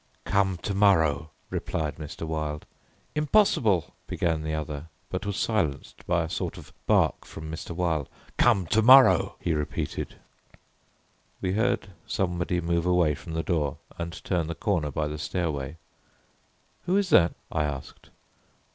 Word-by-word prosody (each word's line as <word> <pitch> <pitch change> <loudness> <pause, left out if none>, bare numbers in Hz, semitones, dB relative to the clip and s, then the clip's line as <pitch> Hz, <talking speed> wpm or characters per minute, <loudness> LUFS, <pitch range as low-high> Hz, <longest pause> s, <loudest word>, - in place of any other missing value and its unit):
"Come 95 -2 +2
to 100 - -1
morrow," 80 -7 +3 0.2
replied 75 -3 -2
Mr. 80 +1 -6
Wilde. 75 -2 -3 0.5
"Impossible," 145 - +3
began 80 -2 0
the 80 0 -2
other, 75 0 -5 0.2
but 95 +3 -3
was 100 -1 -2
silenced 95 -13 -1
by 85 -1 +2
a - - -3
sort - - -3
of - - -12
bark - - +3
from 80 0 -8
Mr. 80 - -6
Wilde. 80 -5 0 0.3
"Come 105 -7 +4
to 110 +7 +3
morrow," 130 +3 +7
he 85 - 0
repeated. 75 -2 -3 1.2
We 90 - -1
heard 110 -1 +1 0.2
somebody 90 -1 0
move 85 0 0
away 90 -4 +3
from 80 +3 -8
the 80 0 -1
door 75 -6 0 0.2
and 85 0 -5
turn 85 -4 0
the 85 - -4
corner 85 -7 0
by 75 +2 -1
the 75 0 -5
stairway. 75 -2 -2 1.1
"Who 185 +2 +3
is 200 -2 0
that?" 85 -1 +5 0.2
I 75 -2 +1
asked. 70 -2 -6
85 Hz, 145 wpm, -27 LUFS, 75-95 Hz, 1.2 s, morrow